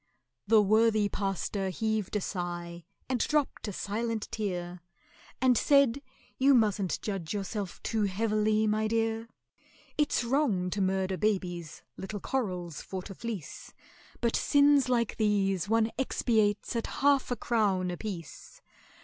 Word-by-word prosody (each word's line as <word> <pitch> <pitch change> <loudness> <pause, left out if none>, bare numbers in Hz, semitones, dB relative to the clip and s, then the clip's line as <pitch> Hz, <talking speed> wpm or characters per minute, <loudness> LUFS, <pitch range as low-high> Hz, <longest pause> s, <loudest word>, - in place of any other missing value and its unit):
The 220 0 +6
worthy 215 0 +3
pastor 195 0 -2
heaved 220 0 -2
a 210 - +1
sigh, 175 -2 -5 0.2
and 255 -2 -1
dropped 300 -4 0
a - - -3
silent 220 +3 -3
tear, 180 -4 -4 0.6
And 255 -1 +4
said, 280 +1 +4 0.4
"You 270 +1 +6
mustn't 210 -5 +1
judge 195 -3 -3
yourself 200 -1 -4
too 220 -2 0
heavily, 215 +2 +1
my 215 0 +1
dear: 225 0 -1 0.7
It's 295 -4 +2
wrong 235 -8 +1
to 200 - -1
murder 190 0 0
babies, 180 -6 -2
little 205 +2 -5
corals 180 - -3
for 190 -1 -6
to 195 - -8
fleece; 210 -6 -7 0.5
But 235 -1 +1
sins 285 -2 +4
like 235 -3 +1
these 200 -3 +1
one 225 0 +2
expiates 220 -5 +1
at 230 - -1
half 280 -1 +2
a 245 - 0
crown 200 -6 +1
apiece. 175 -5 -7
210 Hz, 130 wpm, -29 LUFS, 190-230 Hz, 0.7 s, The